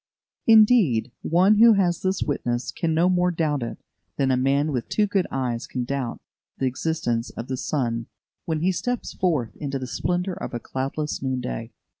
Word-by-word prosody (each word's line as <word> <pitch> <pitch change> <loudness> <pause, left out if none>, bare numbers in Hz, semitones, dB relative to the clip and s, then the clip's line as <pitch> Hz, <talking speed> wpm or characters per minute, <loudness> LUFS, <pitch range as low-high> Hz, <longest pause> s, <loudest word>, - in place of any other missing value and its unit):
Indeed, 210 - +5
one 185 +6 +4
who 230 +1 +8
has 180 -4 +1
this 190 0 0
witness 120 -4 -2
can 160 -2 -1
no 170 +3 +4
more 180 -1 +3
doubt 155 -5 0
it 115 - -4 0.4
than 135 -1 +2
a - - +3
man 140 +4 +1
with 125 -4 -3
two 210 - +2
good 195 -3 0
eyes 125 -3 -2
can 125 - -3
doubt 130 -1 -3 0.4
the 135 - -1
existence 130 -3 -1
of 115 - -7
the 130 - -2
sun 120 -4 -2 0.4
when 160 -2 -1
he 185 +3 +3
steps 245 +6 -3
forth 155 -11 0
into 140 -2 -3
the 130 - -5
splendour 180 - -1
of 130 - -6
a - - -2
cloudless 135 +5 -3
noon 130 -1 -1
day. - - -5
145 Hz, 185 wpm, -24 LUFS, 125-180 Hz, 0.4 s, who